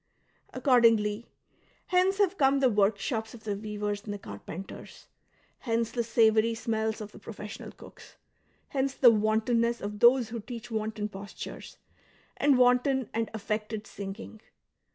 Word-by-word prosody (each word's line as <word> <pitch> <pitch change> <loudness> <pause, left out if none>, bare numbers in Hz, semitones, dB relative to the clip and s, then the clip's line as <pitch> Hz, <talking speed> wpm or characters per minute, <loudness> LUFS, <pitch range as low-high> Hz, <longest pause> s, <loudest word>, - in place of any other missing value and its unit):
Accordingly, 230 -4 +3 0.6
hence 370 +2 +2
have 395 -2 +2
come 275 -4 +3
the 260 -2 +3
woi'kshops 220 +3 0
of 225 - -14
the 210 -2 -2
weavers 210 0 -4
and 210 - -6
the 205 - -4
carpenters; 165 - -9 0.5
hence 230 -2 -1
the 235 - -1
savoury 225 -1 +3
smells 220 -1 -2
of 210 -1 -7
the - - -13
professional 210 -1 -8
cooks; - - -15 0.5
hence 270 -1 -1
the 245 -3 +7
wantonness 225 +2 +1
of 205 +1 -5
those 240 0 +5
who 230 0 -5
teach 235 +1 -8
wanton 215 -1 -2
postui 200 -1 -8
es, - - -12 0.6
and 280 -2 +4
wanton 250 0 +3
and 225 0 -1
affected 215 0 -3
singing. 205 +2 -8
225 Hz, 140 wpm, -28 LUFS, 210-245 Hz, 0.6 s, the